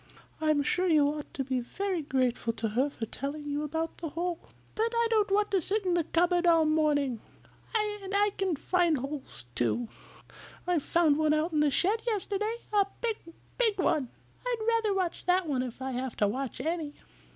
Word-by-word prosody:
I'm 305 Hz, -2 st, +3 dB
sure 365 Hz, +6 st, +1 dB
you 305 Hz, -4 st, +5 dB
ought 295 Hz, +1 st, -3 dB
to 275 Hz, -, -1 dB
be 260 Hz, -1 st, -1 dB
very 370 Hz, +8 st, -2 dB
grateful 255 Hz, -4 st, 0 dB
to 225 Hz, 0 st, -2 dB
her 255 Hz, +7 st, +1 dB
for 235 Hz, -5 st, -5 dB
telling 280 Hz, +6 st, -5 dB
you 290 Hz, 0 st, -1 dB
about 320 Hz, +2 st, -3 dB
the 330 Hz, -, -4 dB
hole." 340 Hz, +2 st, -2 dB, 0.3 s
"But 450 Hz, +1 st, 0 dB
I 465 Hz, 0 st, +3 dB
don't 425 Hz, -3 st, +3 dB
want 415 Hz, +1 st, +2 dB
to 385 Hz, -2 st, +3 dB
sit 400 Hz, +4 st, +1 dB
in 360 Hz, -, +2 dB
the 345 Hz, -2 st, +1 dB
cupboard 350 Hz, +1 st, +2 dB
all 330 Hz, -2 st, +5 dB
morning. 295 Hz, -6 st, +1 dB, 0.5 s
And 415 Hz, -3 st, -1 dB
I 410 Hz, +1 st, +3 dB
can 380 Hz, -4 st, 0 dB
find 345 Hz, +1 st, +2 dB
holes, 270 Hz, -, -5 dB
too. 220 Hz, -, 0 dB, 0.8 s
I 355 Hz, -2 st, +2 dB
found 310 Hz, 0 st, +2 dB
one 310 Hz, -1 st, +3 dB
out 320 Hz, +2 st, 0 dB
in 305 Hz, -, +2 dB
the 300 Hz, 0 st, +4 dB
shed 400 Hz, +10 st, +2 dB
yesterday. 425 Hz, 0 st, -1 dB, 0.2 s
A 400 Hz, -1 st, +4 dB
big, 455 Hz, -2 st, -1 dB, 0.4 s
big 445 Hz, -4 st, +3 dB
one. 310 Hz, -8 st, +1 dB, 0.3 s
I'd 475 Hz, -3 st, -2 dB
rather 455 Hz, -2 st, +2 dB
watch 365 Hz, -2 st, -2 dB
that 360 Hz, 0 st, +3 dB
one 275 Hz, -5 st, 0 dB
if 255 Hz, +1 st, -5 dB
I 265 Hz, -, -2 dB
have 255 Hz, -1 st, -3 dB
to 205 Hz, -, +3 dB
watch 255 Hz, +4 st, -3 dB
any." 315 Hz, +1 st, -2 dB
320 Hz, 195 wpm, -29 LUFS, 280-390 Hz, 0.8 s, you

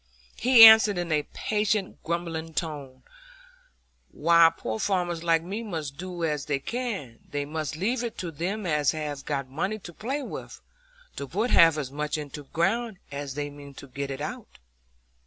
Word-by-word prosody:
He 245 Hz, -2 st, +7 dB
answered 220 Hz, -3 st, +9 dB
in 175 Hz, -2 st, -3 dB
a 150 Hz, -1 st, +1 dB
patient 210 Hz, -2 st, -1 dB
grumbling 165 Hz, -1 st, -3 dB
tone, 145 Hz, -6 st, -5 dB, 1.1 s
"Why, 170 Hz, -1 st, +5 dB
poor 110 Hz, 0 st, -4 dB
farmers 175 Hz, -4 st, -1 dB
like 165 Hz, -1 st, +2 dB
me 200 Hz, +6 st, -4 dB
must 160 Hz, -10 st, -5 dB
do 180 Hz, -1 st, -6 dB
as 150 Hz, -3 st, -1 dB
they 145 Hz, -2 st, +1 dB
can; 195 Hz, -, -5 dB
they 145 Hz, 0 st, -3 dB
must 155 Hz, +1 st, -4 dB
leave 230 Hz, +9 st, -1 dB
it 235 Hz, -, -5 dB
to 175 Hz, -2 st, -4 dB
them 185 Hz, +7 st, -3 dB
as 150 Hz, -4 st, +2 dB
have 150 Hz, -3 st, -4 dB
got 140 Hz, -2 st, -2 dB
money 165 Hz, +11 st, -2 dB
to 175 Hz, -4 st, -11 dB
play 270 Hz, -, -3 dB
with, -, -, -8 dB, 0.6 s
to 140 Hz, -, -4 dB
put 210 Hz, -, -1 dB
half 165 Hz, -2 st, +6 dB
as 135 Hz, -4 st, -4 dB
much 150 Hz, +2 st, -2 dB
into 150 Hz, -1 st, -7 dB
the 140 Hz, -, -19 dB
ground 215 Hz, +5 st, 0 dB
as 140 Hz, -1 st, -5 dB
they 145 Hz, 0 st, -3 dB
mean 145 Hz, -1 st, -12 dB
to -, -, -10 dB
get 140 Hz, +1 st, -5 dB
out 155 Hz, +11 st, -4 dB
of -, -, -12 dB, 0.2 s
it." -, -, -18 dB
165 Hz, 180 wpm, -26 LUFS, 145-200 Hz, 1.1 s, answered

